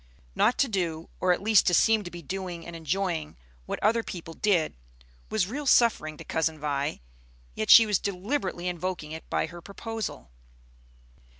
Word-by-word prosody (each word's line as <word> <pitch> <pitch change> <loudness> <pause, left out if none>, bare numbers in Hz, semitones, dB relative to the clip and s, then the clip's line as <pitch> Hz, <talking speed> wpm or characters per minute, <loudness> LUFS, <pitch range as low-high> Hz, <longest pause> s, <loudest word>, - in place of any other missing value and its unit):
Not 235 - +2
to 275 - +3
do, 170 -7 -2
or 185 - +3
at 180 - 0
least 215 -2 +5
to 175 - +4
seem 220 +2 +4
to - - -5
be 175 -1 -9
doing 180 0 -5
and 170 - -8
enjoying, 165 -1 -2 0.3
what - - -3
other 225 +3 +3
people 170 -6 -8
did, 180 -4 +1 0.6
was - - +1
real 275 +8 -5
suffering 185 -12 +3
to - - -9
Cousin 160 -1 -1
Vi. 145 - -2 0.5
Yet 110 - -3
she 230 - +10
was 210 -3 +1
deliberately 200 -1 -2
invoking 175 -3 -3
it 160 +1 -8
by - - 0
her 175 0 -10
proposal. 215 - -6
180 Hz, 170 wpm, -27 LUFS, 160-210 Hz, 0.6 s, she